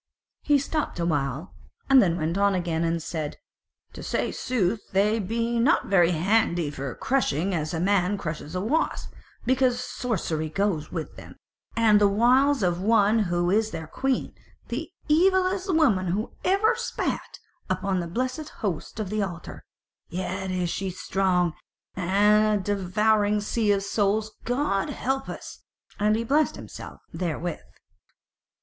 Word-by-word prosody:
He 295 Hz, -1 st, +3 dB
stopped 285 Hz, -, -2 dB
awhile 150 Hz, -2 st, -1 dB, 0.3 s
and 270 Hz, -1 st, +7 dB
then 175 Hz, -3 st, +2 dB
went 165 Hz, +1 st, -1 dB
on 200 Hz, 0 st, +3 dB
again 170 Hz, -2 st, -1 dB
and 165 Hz, -1 st, -1 dB
said: 155 Hz, -3 st, -4 dB, 0.6 s
"To -, -, -9 dB
say -, -, -1 dB
sooth 215 Hz, -4 st, -1 dB
they 210 Hz, +3 st, +3 dB
be 230 Hz, +3 st, -1 dB
not 285 Hz, +9 st, +2 dB
very 175 Hz, -4 st, +5 dB
handy 175 Hz, -2 st, +1 dB
for 135 Hz, -2 st, -5 dB
crushing 195 Hz, -, 0 dB
as 155 Hz, -2 st, -2 dB
a 165 Hz, -, -2 dB
man 195 Hz, +1 st, +2 dB
crushes 155 Hz, -1 st, -5 dB
a 180 Hz, -, -1 dB
wasp, 280 Hz, +11 st, -1 dB, 0.3 s
because 255 Hz, -1 st, +2 dB
sorcery 185 Hz, -11 st, -2 dB
goes 175 Hz, -3 st, -1 dB
with 160 Hz, -2 st, -5 dB
them, -, -, -11 dB, 0.4 s
and 215 Hz, -2 st, +4 dB
the 205 Hz, -, +6 dB
wiles 250 Hz, +5 st, +3 dB
of 175 Hz, -1 st, +1 dB
one 215 Hz, +1 st, +4 dB
who 175 Hz, -3 st, +1 dB
is 220 Hz, +2 st, +2 dB
their 160 Hz, -, -6 dB
Queen, 265 Hz, +11 st, -2 dB, 0.4 s
the -, -, -4 dB, 0.2 s
evilest 375 Hz, +4 st, +3 dB
woman 245 Hz, -, +3 dB
who 200 Hz, +7 st, -2 dB
ever 405 Hz, +5 st, +3 dB
spat -, -, -3 dB, 0.3 s
upon 185 Hz, 0 st, 0 dB
the 170 Hz, -, -3 dB
blessed 255 Hz, -, -3 dB
Host 180 Hz, 0 st, -4 dB
of 205 Hz, -3 st, -3 dB
the 215 Hz, 0 st, 0 dB
Altar: 175 Hz, -4 st, -6 dB, 0.5 s
yet 185 Hz, +1 st, -3 dB
is 180 Hz, -2 st, -1 dB
she 195 Hz, -1 st, -2 dB
strong, 180 Hz, -2 st, 0 dB, 0.4 s
a 210 Hz, +3 st, +3 dB
devouring 205 Hz, +2 st, +1 dB
sea 210 Hz, +1 st, 0 dB
of 200 Hz, -1 st, +1 dB
souls, 210 Hz, +1 st, 0 dB
God 245 Hz, -5 st, 0 dB
help 270 Hz, +1 st, -2 dB
us!" -, -, -8 dB, 0.4 s
And 210 Hz, +1 st, +3 dB
he 230 Hz, -, -1 dB
blessed 295 Hz, +6 st, +2 dB
himself -, -, -10 dB
therewith. 175 Hz, -1 st, -3 dB
200 Hz, 145 wpm, -25 LUFS, 175-230 Hz, 0.6 s, and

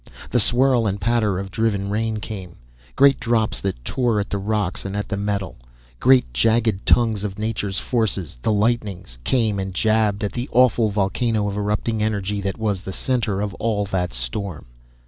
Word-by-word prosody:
The 120 Hz, -, +3 dB
swirl 120 Hz, +1 st, +3 dB
and 100 Hz, 0 st, -2 dB
patter 105 Hz, -2 st, +1 dB
of 95 Hz, 0 st, -5 dB
driven 100 Hz, -3 st, 0 dB
rain 110 Hz, +1 st, -1 dB
came 95 Hz, -5 st, -7 dB, 0.4 s
great 140 Hz, 0 st, +5 dB
drops 115 Hz, -2 st, 0 dB
that 95 Hz, -12 st, -4 dB
tore 120 Hz, -5 st, +1 dB
at 100 Hz, -, -4 dB
the 100 Hz, -, -1 dB
rocks, 100 Hz, -2 st, -1 dB
and 100 Hz, +1 st, -4 dB
at 105 Hz, -, -2 dB
the 100 Hz, -, -1 dB
metal. 100 Hz, -1 st, -2 dB, 0.4 s
Great 130 Hz, -, +4 dB
jagged 110 Hz, -, +1 dB
tongues 110 Hz, -4 st, +3 dB
of 100 Hz, -1 st, -4 dB
nature's 105 Hz, -3 st, -2 dB
forces, 100 Hz, -, -2 dB
the 110 Hz, -, +1 dB
lightnings, 105 Hz, -, -1 dB
came 110 Hz, -, +1 dB
and 95 Hz, -1 st, -4 dB
jabbed 110 Hz, 0 st, +2 dB
at 105 Hz, -, -1 dB
the 120 Hz, +2 st, -4 dB
awful 120 Hz, -3 st, +4 dB
volcano 105 Hz, +2 st, 0 dB
of 100 Hz, -, -3 dB
erupting 105 Hz, +2 st, -1 dB
energy 105 Hz, -1 st, -1 dB
that 100 Hz, -1 st, -3 dB
was 105 Hz, -4 st, -1 dB
the 95 Hz, -, -6 dB
center 110 Hz, -3 st, -1 dB
of 105 Hz, -2 st, -2 dB
all 105 Hz, -2 st, 0 dB
that 90 Hz, -2 st, -1 dB
storm. 75 Hz, -, -4 dB
105 Hz, 180 wpm, -22 LUFS, 100-115 Hz, 0.4 s, great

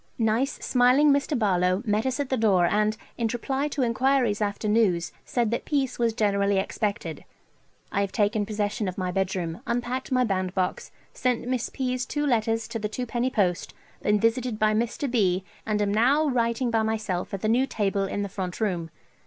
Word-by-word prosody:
Nice 230 Hz, +4 st, +1 dB
smiling 255 Hz, +4 st, +4 dB
Mr. 280 Hz, +1 st, +1 dB
Barlowe 185 Hz, -2 st, +1 dB
met 215 Hz, +3 st, +1 dB
us 260 Hz, +2 st, -1 dB
at 280 Hz, -2 st, -2 dB
the 260 Hz, -, +1 dB
door 200 Hz, -7 st, +3 dB
and, 210 Hz, +4 st, +1 dB, 0.2 s
in 230 Hz, -, +1 dB
reply 270 Hz, +4 st, -1 dB
to 285 Hz, -2 st, -1 dB
enquiries 245 Hz, -2 st, +2 dB
after 205 Hz, +1 st, -1 dB
news, 205 Hz, -6 st, +2 dB
said 235 Hz, -3 st, 0 dB
that 235 Hz, -, -1 dB
peace 270 Hz, -4 st, -1 dB
was 235 Hz, -1 st, +2 dB
generally 200 Hz, -2 st, +1 dB
expected. 195 Hz, -4 st, -2 dB, 0.7 s
I 200 Hz, -, +1 dB
have 200 Hz, -1 st, -1 dB
taken 210 Hz, 0 st, +1 dB
possession 210 Hz, 0 st, -2 dB
of 185 Hz, +2 st, -4 dB
my 185 Hz, -1 st, -1 dB
bedroom, 185 Hz, -1 st, -2 dB
unpacked 245 Hz, +2 st, -2 dB
my 255 Hz, -1 st, +3 dB
bandbox, 185 Hz, -3 st, -1 dB, 0.2 s
sent 250 Hz, -1 st, -1 dB
Miss 250 Hz, -2 st, -1 dB
P.'s 255 Hz, -2 st, -2 dB
two 295 Hz, 0 st, -1 dB
letters 225 Hz, -3 st, +1 dB
to 225 Hz, -, -3 dB
the 210 Hz, 0 st, -2 dB
twopenny 245 Hz, +2 st, -2 dB
post, 185 Hz, -8 st, 0 dB, 0.3 s
been 210 Hz, 0 st, +2 dB
visited 230 Hz, +1 st, +1 dB
by 215 Hz, 0 st, +2 dB
Md. 235 Hz, +4 st, -1 dB
B., 190 Hz, -6 st, +2 dB, 0.2 s
and 210 Hz, -1 st, +1 dB
am 200 Hz, 0 st, 0 dB
now 265 Hz, +8 st, +3 dB
writing 235 Hz, -1 st, 0 dB
by 225 Hz, -1 st, +2 dB
myself 215 Hz, -5 st, -2 dB
at 195 Hz, -, -4 dB
the -, -, 0 dB
new 250 Hz, +4 st, +3 dB
table 200 Hz, -4 st, 0 dB
in 205 Hz, +1 st, -2 dB
the -, -, -2 dB
front 185 Hz, -2 st, -5 dB
room. 180 Hz, -7 st, -1 dB
220 Hz, 185 wpm, -26 LUFS, 200-250 Hz, 0.7 s, smiling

